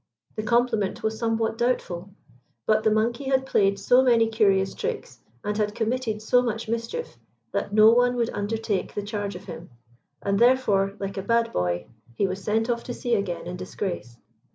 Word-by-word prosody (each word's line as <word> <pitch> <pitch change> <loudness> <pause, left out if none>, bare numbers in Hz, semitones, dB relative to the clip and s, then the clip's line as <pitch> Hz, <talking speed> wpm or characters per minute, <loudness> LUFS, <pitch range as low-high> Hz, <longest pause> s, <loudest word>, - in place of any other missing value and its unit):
The 215 - -2
compliment 225 -2 +1
was 220 0 -1
somewhat 225 -1 0
doubtful. 195 -7 -1 0.6
But 215 0 +3
the 220 - +3
monkey 230 +5 0
had 265 0 +1
played 200 -6 +2
so 245 +6 +4
many 235 -3 +4
curious 195 -4 +2
tricks, 470 +1 -5 0.2
and 210 0 -2
had 210 -1 -1
committed 225 -2 -1
so 245 +3 +4
much 230 -2 -3
mischief, 230 - -4 0.3
that - - -2
no 215 +1 +7
one 245 +1 +3
would 235 -1 0
undertake 205 -1 -2
the 205 - -2
charge 205 -1 -4
of - - -9
him; 175 -1 -9 0.5
and 200 0 +1
therefore, 210 -6 +3
like 195 0 -4
a - - -1
bad 230 +3 +1
boy, 90 0 -1 0.3
he 200 - +1
was 190 +1 -4
sent 220 +3 +1
off 235 -1 -1
to 245 - -5
sea 240 - -2
again 200 -5 -1
in 180 +1 -5
disgrace. 180 - -5
220 Hz, 180 wpm, -25 LUFS, 200-235 Hz, 0.6 s, no